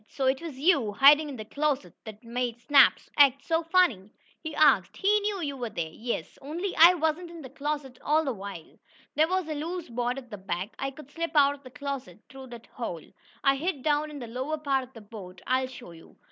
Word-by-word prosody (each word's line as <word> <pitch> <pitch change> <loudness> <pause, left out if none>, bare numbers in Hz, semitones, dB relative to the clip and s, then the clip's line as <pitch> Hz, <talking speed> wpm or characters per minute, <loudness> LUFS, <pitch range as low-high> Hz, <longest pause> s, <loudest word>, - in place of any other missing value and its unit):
"So 270 - -3
it 265 +2 +1
was 320 -6 -7
you, 275 - +2
hiding 290 +6 +6
in 280 - -6
the 215 -3 -7
closet 280 - -2
that 215 0 -10
made 240 0 -3
Snap 280 +3 +6 0.2
act 275 -1 +5
so 325 0 +1
funny?" 325 - +2 0.3
he 315 -2 -6
asked. 310 - +4
"He 415 +2 +3
knew 410 -2 -2
you 285 -2 -3
were 245 -3 -4
there." 170 -7 -4
"Yes, 235 +7 -5
only 340 +7 -4
I 340 +3 +8
wasn't 320 +1 -1
in 335 -2 -10
the 260 - -10
closet 285 -3 -4
all 310 +2 +2
the 265 - -1
while. 195 -5 -9 0.3
There 310 +1 +3
was 370 -1 -1
a 310 - -3
loose 330 +3 -5
board 245 +2 -2
at 250 -3 -10
the 210 - -7
back. 190 +2 -4
I 270 - -1
could 285 0 -13
slip 335 +1 -4
out 285 -1 +5
of 285 - -13
the 260 - -12
closet 265 -9 -6
through 265 -2 -11
that 235 -2 -11
hole. 180 -10 -6 0.4
I 275 -1 +4
hid 300 -3 -3
down 300 0 +1
in 300 - -8
the 250 - -6
lower 260 +7 -3
part 275 -3 0
of 255 +1 -15
the 225 - -11
boat. 200 -4 -11
I'll 260 0 +1
show 245 -7 -11
you." 165 -1 -16
275 Hz, 230 wpm, -27 LUFS, 240-310 Hz, 0.4 s, I